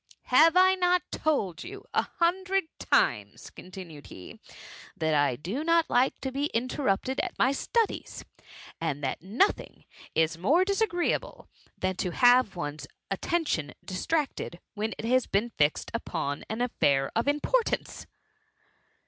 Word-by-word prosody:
^^ - - -58 0.3
Have 320 +7 +6
I 375 +1 +6
not 360 -1 +2
told 210 - -1
you 400 +4 -9
a - - +3
hundred 380 +3 0 0.2
times,^^ - - 0
continued 180 -5 -10
he, 90 - -11
^^ - - -16 0.4
that 160 -1 0
I 145 -4 +2
do 190 - -4
not 335 0 +2
like 250 +2 +2
to 265 - -3
be 275 +2 -1
interrupted 255 0 0
at - - -3
my 260 - +3
studies! 450 - -2 0.6
and 145 -3 -2
that 135 - -2
nothing 220 - 0 0.3
is 160 +1 +1
more 315 - +3
disagreeable 395 -3 -1 0.3
than 185 -1 -2
to 180 -2 -2
have 245 -4 +5
one's 145 -4 -5 0.2
attention 195 - -1
distracted, 195 - -2
when 215 +1 -3
it - - -6
has 255 +2 +2
been 215 +4 0
fixed 150 -5 0
upon 160 -10 -3
an 220 +2 -3
affair 140 - +1
of 230 +4 0
importance 370 +12 0
245 Hz, 140 wpm, -28 LUFS, -, 0.6 s, Have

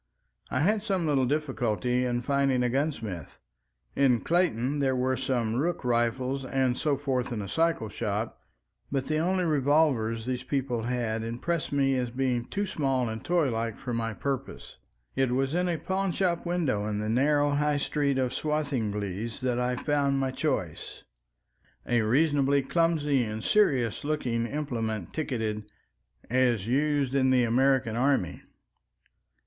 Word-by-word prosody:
I 130 - 0
had 210 +6 +2
some 195 -5 -1
little 135 -4 +2
difficulty 125 -4 0
in 120 0 -1
finding 135 -1 +2
a 125 - +1
gunsmith. 115 - -3 0.6
In 130 -4 +3
Clayton 150 -6 +1
there 135 -2 +1
were 130 +1 +1
some 120 -4 -1
rook 165 0 -1
rifles 125 +3 0
and 130 -1 +1
so 145 0 0
forth 130 -4 -1
in 115 - -2
a 100 - -4
cycle 165 - +1
shop, 105 +1 -3 0.5
but 135 -1 -1
the 155 0 0
only 185 +3 +1
revolvers 140 -7 +2
these 125 -1 -2
people 130 -3 -2
had 120 -3 -1
impressed 120 +9 -2
me 135 -1 +2
as 125 -1 -1
being 125 -1 -1
too 205 +9 -2
small 135 - 0
and 110 0 -6
toylike 115 -10 0
for 125 -3 -5
my 115 -1 -1
purpose. 135 +1 -5 0.4
It 135 -2 +1
was 135 +2 0
in 180 +1 +1
a 170 - 0
pawnshop 185 0 -1
window 145 -13 0
in 105 -1 -2
the 105 +1 -2
narrow 145 +5 +2
High 150 0 +1
Street 140 -1 0
of 130 -1 0
Swathinglea 115 -10 -2
that 125 -1 0
I 125 0 0
found 140 0 +1
my 135 -1 0
choice, 130 - -3 0.8
a 120 -1 +2
reasonably 140 +3 +2
clumsy 150 -4 +2
and 110 -1 -4
serious 135 - +2
looking 125 -6 -1
implement 115 - -3
ticketed 110 -8 -3 0.6
"As 120 -4 +2
used 140 +2 +1
in 130 -1 +3
the 130 -1 +4
American 125 -1 +2
army." 125 -8 +1
130 Hz, 150 wpm, -28 LUFS, 120-145 Hz, 0.8 s, the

